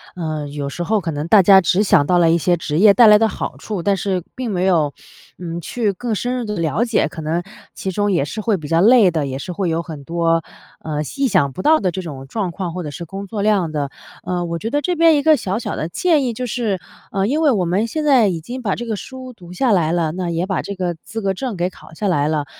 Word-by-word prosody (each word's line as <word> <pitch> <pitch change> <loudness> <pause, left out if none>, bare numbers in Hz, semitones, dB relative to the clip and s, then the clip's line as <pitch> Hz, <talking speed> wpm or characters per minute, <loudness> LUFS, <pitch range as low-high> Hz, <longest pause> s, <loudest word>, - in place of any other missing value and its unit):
呃， 155 -4 -4
有 145 -1 -4
时 175 - -4
候 210 +4 +1
可 175 - -4
能 145 +2 -4
大 200 +3 +7
家 190 +1 +7
只 180 +4 +2
想 165 -8 +4
到 180 - +2
了 170 -1 +4
一 170 - +4
些 175 +2 +2
职 155 -2 -3
业 200 +3 +7
带 235 0 +7
来 210 0 +8
的 225 +1 +3
好 - - -5
处， 205 -5 -5
但 200 +2 +1
是 185 -2 -2
并 255 -3 -3
没 185 -1 0
有， 155 -7 +2 0.5
嗯， 170 -1 -5
去 220 +3 -1
更 235 +3 -3
深 245 +4 -2
入 245 - -2
地 210 -1 -4
了 165 +6 0
解， 235 -2 +1
可 160 - -8
能 165 +3 -1 0.3
其 190 - -5
中 205 +2 0
也 170 - +2
是 215 - -6
会 215 -1 +1
比 155 -4 -8
较 165 +3 +2
累 225 -2 +6
的， 160 -4 -1
也 135 -1 -4
是 180 - -6
会 180 +1 -2
有 165 +1 0
很 160 -4 -9
多， 165 +1 0 0.4
呃， 150 -1 -3 0.2
意 275 -1 +2
想 140 - +2
不 160 - -6
到 315 +1 +5
的 190 - 0
这 185 +2 -4
种 135 -5 -8
状 190 +3 -3
况， 175 0 -4
或 180 0 -4
者 150 - -5
是 170 - -7
工 195 +4 -7
作 205 +1 -4
量 200 -6 +1
的。 145 -2 -2 0.3
呃， 175 -1 -2
我 170 0 -3
觉 220 - -3
得 290 +4 0
这 355 +5 -1
边 330 -1 +5
一 285 - +1
个 310 -1 +5
小 195 -3 -2
小 230 - -4
的 155 - -3
建 315 - +2
议 245 -2 -1
就 250 +3 -4
是， 220 -5 -2 0.3
呃， 195 0 0
因 290 +9 0
为 305 - +4
我 195 -7 +1
们 195 +7 0
现 310 +6 -3
在 260 -7 +5
已 175 -4 -1
经 250 +10 -7
把 200 -5 -1
这 240 - -6
个 225 -2 -2
书 255 +4 -9
读 180 -6 -13
下 240 +6 +1
来 170 -6 +2
了， 165 -2 0
那 180 0 -3
也 170 +1 -1
把 190 -1 -1
这 200 - -6
个 180 -2 -2
资 225 - -6
格 195 -2 0
证 235 +2 -4
给 175 +1 0
考 160 - -16
下 205 - -2
来 150 -6 +1
了。 150 -2 -1
185 Hz, 300 characters per minute, -19 LUFS, 165-225 Hz, 0.5 s, 来